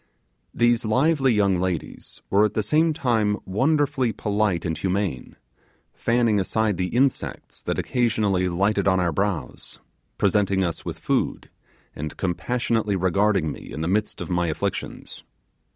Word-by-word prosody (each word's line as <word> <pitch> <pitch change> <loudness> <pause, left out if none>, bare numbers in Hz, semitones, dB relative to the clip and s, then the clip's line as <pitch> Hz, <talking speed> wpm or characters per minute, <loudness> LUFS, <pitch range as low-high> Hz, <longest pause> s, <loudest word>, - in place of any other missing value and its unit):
These 120 0 +2
lively 135 +4 +2
young 100 -4 +2
ladies 90 -3 -4
were 100 +2 +5
at 105 - 0
the 110 - +1
same 155 +9 +3
time 115 -8 +1
wonderfully 135 +3 +1
polite 105 -5 -1
and 80 -2 -1
humane; 95 -8 -2 0.6
fanning 115 -3 +2
aside 105 +1 0
the 90 - 0
insects 130 +6 -1
that - - -2
occasionally 105 -7 +1
lighted 100 +3 +1
on 95 -1 +3
our 90 -2 +1
brows; 95 -5 -3 0.4
presenting 100 -1 +2
us 85 -3 -3
with - - -5
food; - - -1 0.4
and 75 0 -6
compassionately 110 +3 -1
regarding 95 -2 +1
me - - -10
in 75 - -5
the 80 - -1
midst 105 +4 -1
of - - -5
my 90 -1 +1
afflictions. 80 - -4
105 Hz, 140 wpm, -24 LUFS, 90-115 Hz, 0.6 s, were